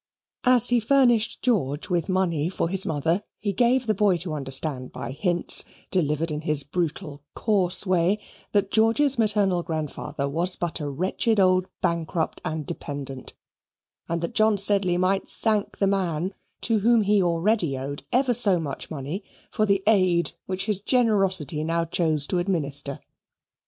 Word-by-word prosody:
As 250 Hz, -1 st, +5 dB
he 245 Hz, -1 st, +3 dB
furnished 240 Hz, -2 st, +2 dB
George 165 Hz, -, 0 dB
with 175 Hz, +1 st, -1 dB
money 175 Hz, -4 st, 0 dB
for 185 Hz, -, -2 dB
his 190 Hz, +1 st, +1 dB
mother, 165 Hz, +5 st, 0 dB, 0.2 s
he 205 Hz, -2 st, -3 dB
gave 245 Hz, +4 st, +2 dB
the 220 Hz, -, +1 dB
boy 200 Hz, -2 st, +2 dB
to 170 Hz, -2 st, -5 dB
understand 135 Hz, -2 st, -1 dB
by 120 Hz, -, -6 dB
hints, 175 Hz, +5 st, +3 dB, 0.3 s
delivered 160 Hz, -2 st, 0 dB
in 150 Hz, 0 st, -3 dB
his 150 Hz, -2 st, +2 dB
brutal, 150 Hz, -2 st, -4 dB
coarse 195 Hz, -4 st, +2 dB
way, 185 Hz, +2 st, +1 dB, 0.3 s
that 200 Hz, -1 st, 0 dB
George's 230 Hz, +5 st, +3 dB
maternal 205 Hz, -5 st, +2 dB
grandfather 155 Hz, -3 st, -4 dB
was 170 Hz, +6 st, +2 dB
but 175 Hz, -1 st, -3 dB
a 145 Hz, -2 st, -4 dB
wretched 190 Hz, -, 0 dB
old 185 Hz, -1 st, +3 dB, 0.2 s
bankrupt 165 Hz, -1 st, -2 dB
and 155 Hz, -1 st, -4 dB
dependant, 135 Hz, -2 st, -6 dB, 0.7 s
and 170 Hz, 0 st, -2 dB
that 170 Hz, -, -3 dB
John 215 Hz, -1 st, +3 dB
Sedley 195 Hz, -3 st, +3 dB
might 190 Hz, +2 st, 0 dB
thank 215 Hz, -2 st, -2 dB
the 200 Hz, -, +1 dB
man 185 Hz, -2 st, -1 dB, 0.3 s
to 225 Hz, -2 st, +2 dB
whom 230 Hz, +1 st, +3 dB
he 205 Hz, 0 st, +3 dB
already 170 Hz, -3 st, 0 dB
owed 140 Hz, +2 st, -5 dB
ever 255 Hz, 0 st, +2 dB
so 205 Hz, -6 st, +3 dB
much 145 Hz, -4 st, -5 dB
money 155 Hz, +6 st, -5 dB, 0.3 s
for 215 Hz, -, 0 dB
the 195 Hz, -1 st, +1 dB
aid 185 Hz, -5 st, +3 dB, 0.2 s
which 190 Hz, 0 st, -1 dB
his 210 Hz, -3 st, +1 dB
generosity 195 Hz, -, +1 dB
now 165 Hz, +1 st, -1 dB
chose 160 Hz, -3 st, +1 dB
to 180 Hz, -, -1 dB
administer. 145 Hz, -6 st, -2 dB
180 Hz, 155 wpm, -24 LUFS, 155-210 Hz, 0.7 s, As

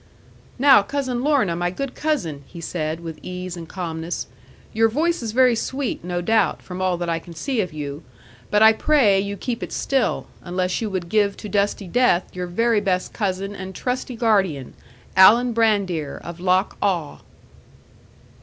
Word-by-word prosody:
'"Now, 270 Hz, -5 st, +7 dB
Cousin 255 Hz, +2 st, -2 dB
Lorna, 275 Hz, -, +2 dB
my 175 Hz, +1 st, 0 dB
good 260 Hz, +8 st, -5 dB
cousin," 175 Hz, -, -2 dB
he 175 Hz, -, -11 dB
said, 160 Hz, -1 st, -3 dB
with 165 Hz, -2 st, -7 dB
ease 180 Hz, 0 st, -6 dB
and 165 Hz, -2 st, -9 dB
calmness; 165 Hz, -2 st, -4 dB, 0.5 s
"your 225 Hz, 0 st, +3 dB
voice 325 Hz, +8 st, 0 dB
is 225 Hz, -2 st, -3 dB
very 250 Hz, +1 st, +4 dB
sweet, 265 Hz, -1 st, -3 dB
no 175 Hz, 0 st, -2 dB
doubt, 220 Hz, +5 st, +1 dB
from 180 Hz, 0 st, -7 dB
all 185 Hz, -1 st, +1 dB
that 175 Hz, 0 st, -3 dB
I 165 Hz, -1 st, 0 dB
can 170 Hz, 0 st, -13 dB
see 255 Hz, -, -1 dB
of 180 Hz, -3 st, -4 dB
you. 145 Hz, -1 st, -6 dB, 0.5 s
But 210 Hz, +1 st, +4 dB
I 220 Hz, 0 st, +8 dB
pray 220 Hz, -6 st, +3 dB
you 200 Hz, +1 st, -3 dB
keep 240 Hz, +1 st, -4 dB
it -, -, -5 dB
still, 270 Hz, -2 st, 0 dB, 0.2 s
unless 180 Hz, +2 st, -2 dB
you 220 Hz, -, -2 dB
would 185 Hz, -3 st, -3 dB
give 200 Hz, +1 st, +1 dB
to -, -, -7 dB
dusty 200 Hz, -1 st, 0 dB
death 185 Hz, -4 st, +2 dB
your 180 Hz, 0 st, -3 dB
very 230 Hz, +4 st, +1 dB
best 185 Hz, -3 st, -1 dB
cousin 195 Hz, -1 st, -2 dB
and 190 Hz, -1 st, -7 dB
trusty 250 Hz, +2 st, -3 dB
guardian, 195 Hz, -, +1 dB, 0.4 s
Alan 230 Hz, +6 st, +7 dB
Brandir 200 Hz, -10 st, 0 dB
of 170 Hz, 0 st, -8 dB
Loch 185 Hz, +2 st, +1 dB
Awe." 175 Hz, -7 st, -1 dB
195 Hz, 175 wpm, -22 LUFS, 175-230 Hz, 0.5 s, I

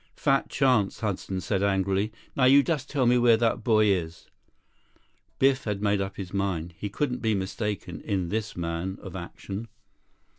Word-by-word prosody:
"Fat 135 Hz, -1 st, +1 dB
chance," 125 Hz, -8 st, +2 dB
Hudson 95 Hz, -3 st, -2 dB
said 95 Hz, +2 st, -1 dB
angrily. 100 Hz, +1 st, +1 dB, 0.2 s
"Now 130 Hz, -, +3 dB
you 140 Hz, +2 st, +7 dB
just 145 Hz, -4 st, -2 dB
tell 135 Hz, -3 st, +1 dB
me 120 Hz, +1 st, +4 dB
where 120 Hz, -2 st, +5 dB
that 115 Hz, 0 st, 0 dB
boy 110 Hz, -2 st, +4 dB
is." 85 Hz, -5 st, -1 dB, 1.1 s
Biff 135 Hz, 0 st, +3 dB
had 105 Hz, -2 st, -2 dB
made 100 Hz, -1 st, +1 dB
up 95 Hz, 0 st, -4 dB
his 95 Hz, -2 st, -6 dB
mind. 90 Hz, -4 st, -2 dB
He 105 Hz, -, -5 dB
couldn't 125 Hz, +2 st, -2 dB
be 110 Hz, -2 st, +1 dB
mistaken 95 Hz, -3 st, -4 dB
in 95 Hz, -5 st, -1 dB
this 110 Hz, -1 st, -3 dB
man 85 Hz, +3 st, -3 dB
of -, -, -8 dB
action. 95 Hz, +4 st, -6 dB
100 Hz, 170 wpm, -27 LUFS, 95-120 Hz, 1.1 s, you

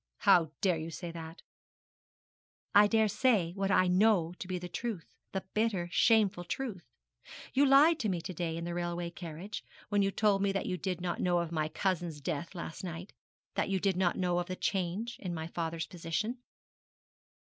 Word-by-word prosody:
'How 175 Hz, -6 st, +5 dB
dare 180 Hz, -4 st, +2 dB
you 160 Hz, +1 st, -5 dB
say 170 Hz, +1 st, -6 dB
that?' 165 Hz, 0 st, -9 dB, 1.3 s
'I 205 Hz, 0 st, +8 dB
dare 220 Hz, 0 st, +3 dB
say 210 Hz, -6 st, +2 dB
what 195 Hz, 0 st, -1 dB
I 185 Hz, -, +4 dB
know 180 Hz, -2 st, +3 dB
to -, -, -6 dB
be 185 Hz, -1 st, -2 dB
the 180 Hz, 0 st, -6 dB
truth 210 Hz, -2 st, -5 dB, 0.2 s
the 190 Hz, -1 st, -3 dB
bitter, 210 Hz, -6 st, 0 dB
shameful 210 Hz, -6 st, +3 dB
truth. 195 Hz, -1 st, -4 dB, 0.7 s
You 280 Hz, +2 st, +5 dB
lied 295 Hz, +4 st, +6 dB
to 220 Hz, -6 st, 0 dB
me 180 Hz, -3 st, 0 dB
to 185 Hz, -, -6 dB
day 165 Hz, -1 st, -2 dB
in 170 Hz, -, -4 dB
the 170 Hz, 0 st, -3 dB
railway 175 Hz, 0 st, -2 dB
carriage, 175 Hz, +3 st, -7 dB, 0.3 s
when 205 Hz, -1 st, +2 dB
you 195 Hz, -, +3 dB
told 200 Hz, -1 st, +2 dB
me 200 Hz, 0 st, +2 dB
that 195 Hz, -, -1 dB
you 185 Hz, -, -1 dB
did 180 Hz, -1 st, -3 dB
not 175 Hz, -1 st, -2 dB
know 180 Hz, -1 st, +2 dB
of 170 Hz, -1 st, -1 dB
my 155 Hz, -2 st, 0 dB
cousins' 175 Hz, -4 st, -1 dB
death 150 Hz, +6 st, -4 dB
last 170 Hz, +2 st, -6 dB
night 175 Hz, +1 st, -6 dB, 0.4 s
that -, -, 0 dB
you 195 Hz, -1 st, +1 dB
did 195 Hz, 0 st, +1 dB
not 180 Hz, -1 st, +1 dB
know 175 Hz, -1 st, +1 dB
of 175 Hz, -, -3 dB
the 185 Hz, -, -3 dB
change 195 Hz, +6 st, -2 dB
in 180 Hz, -3 st, -4 dB
my 160 Hz, 0 st, -4 dB
father's 165 Hz, -1 st, -3 dB
position.' 180 Hz, +9 st, -3 dB
180 Hz, 195 wpm, -32 LUFS, 170-205 Hz, 1.3 s, I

